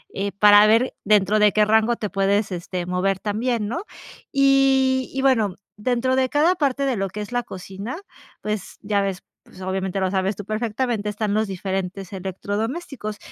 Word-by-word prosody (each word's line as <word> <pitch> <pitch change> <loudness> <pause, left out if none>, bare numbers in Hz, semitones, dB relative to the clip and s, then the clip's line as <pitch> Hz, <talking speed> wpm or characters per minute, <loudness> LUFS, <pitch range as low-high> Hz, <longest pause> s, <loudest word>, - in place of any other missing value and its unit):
eh, 200 +1 -2
para 205 +1 +7
ver 230 +4 +3
dentro 210 0 +3
de 210 -1 +5
qué 215 - +3
rango 220 +2 +3
te 210 -3 -4
puedes, 200 +1 +1
este, 175 0 -4
mover 185 +1 0
también, 220 +1 -1
¿no? 340 - -3 0.5
Y 270 -1 +3
y 265 - -1
bueno, 225 -8 +2 0.2
dentro 250 +4 0
de 260 0 +2
cada 320 +5 +3
parte 280 -3 0
de 255 - +1
lo 195 -1 -2
que 210 +3 -6
es 210 - -7
la 245 0 0
cocina, 195 - -7 0.4
pues 210 -2 -4
ya 205 -1 0
ves, 195 -2 -2 0.2
pues 185 - -15
obviamente 190 0 -2
lo 190 -1 +1
sabes 190 +1 0
tú 205 - -7
perfectamente, 215 +1 -2
están 210 0 -2
los 220 0 +2
diferentes 190 0 -4
electrodomésticos. 210 - -4
210 Hz, 175 wpm, -22 LUFS, 195-245 Hz, 0.5 s, para